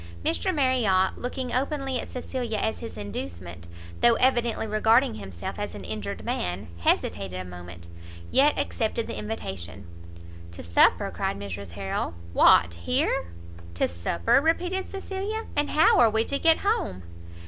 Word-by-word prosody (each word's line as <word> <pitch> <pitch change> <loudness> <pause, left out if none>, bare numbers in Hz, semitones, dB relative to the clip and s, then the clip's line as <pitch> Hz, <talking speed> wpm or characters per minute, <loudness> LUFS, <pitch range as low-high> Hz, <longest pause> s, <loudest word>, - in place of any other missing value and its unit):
Mr 380 - +1
Marriot, 250 - +2
looking 250 0 -4
openly 270 0 -1
at - - -5
Cecilia 245 -3 -4
as 220 +1 -1
his 230 - -8
inducement, 90 -4 -7 0.3
though 235 -1 +5
evidently 240 -3 +2
regarding 220 +4 +3
himself 95 -5 -7
as - - -4
an - - -8
injured 100 -3 -5
man, 90 +1 -3
hesitated 90 +1 0
a 90 - -5
moment, 90 -1 -10 0.4
yet 285 +3 +4
accepted 225 -1 -1
the - - -5
invitation. 95 - -6 0.7
"To - - -9
supper?" 85 +1 +4
cried - - -2
Mrs 100 -2 -7
Harrel, 95 -2 -3 0.2
"what 85 0 +6
here?" 85 +1 0 0.5
"To - - +2
supper?" 85 - +1
repeated 355 +4 0
Cecilia, 395 +3 -4
"and 290 0 +1
how 310 +1 +5
are 235 -2 +7
we 220 +1 +1
to 280 - -1
get 325 -1 +5
home?" 400 - 0
210 Hz, 145 wpm, -26 LUFS, -, 0.7 s, are